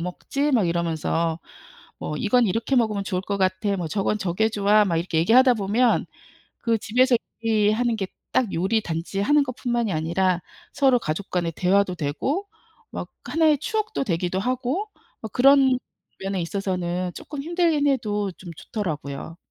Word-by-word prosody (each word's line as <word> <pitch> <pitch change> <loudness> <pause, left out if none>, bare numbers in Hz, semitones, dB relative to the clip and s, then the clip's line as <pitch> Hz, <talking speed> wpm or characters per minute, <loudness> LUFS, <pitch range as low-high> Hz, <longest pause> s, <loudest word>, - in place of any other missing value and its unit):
먹지?" 275 - -2
막 215 -9 +3
이러면서 165 -1 -1 0.6
뭐 150 - -4
"이건 235 - +3
이렇게 225 +7 0
먹으면 215 -4 +1
좋을 185 -2 -2
것 200 +1 -2
같아. 190 +2 0
뭐 175 -3 -3
저건 205 +5 0
저게 190 +4 +1
좋아." 210 0 +3
막 170 -4 0
이렇게 165 -1 -1
얘기하다 245 +8 +5
보면 220 +3 +1 0.5
그 230 -1 +1
집에서 250 +4 +3 0.3
요리하는 225 +2 +2
게 195 -3 -2 0.3
딱 235 -6 +2
요리 195 +6 +1
단지 170 +2 -4
하는 290 +7 +4
것뿐만이 240 -5 -2
아니라 175 +3 0 0.3
서로 270 -3 +4
가족 165 +1 -4
간의 175 -2 0
대화도 185 +1 +2
되고 260 - -2 0.4
막 - - -5 0.2
하나의 310 -3 +3
추억도 430 +1 -2
되기도 180 -3 -1
하고 255 - -1 0.4
아 - - -3
그런 265 0 +5 0.4
면에 195 -1 -2
있어서는 180 -1 -2
쪼끔 290 -2 -7
힘들긴 335 -3 +1
해도 210 -7 0
좀 185 - -10
좋더라고요. 160 -5 -5
205 Hz, 325 characters per minute, -24 LUFS, 180-250 Hz, 0.6 s, 얘기하다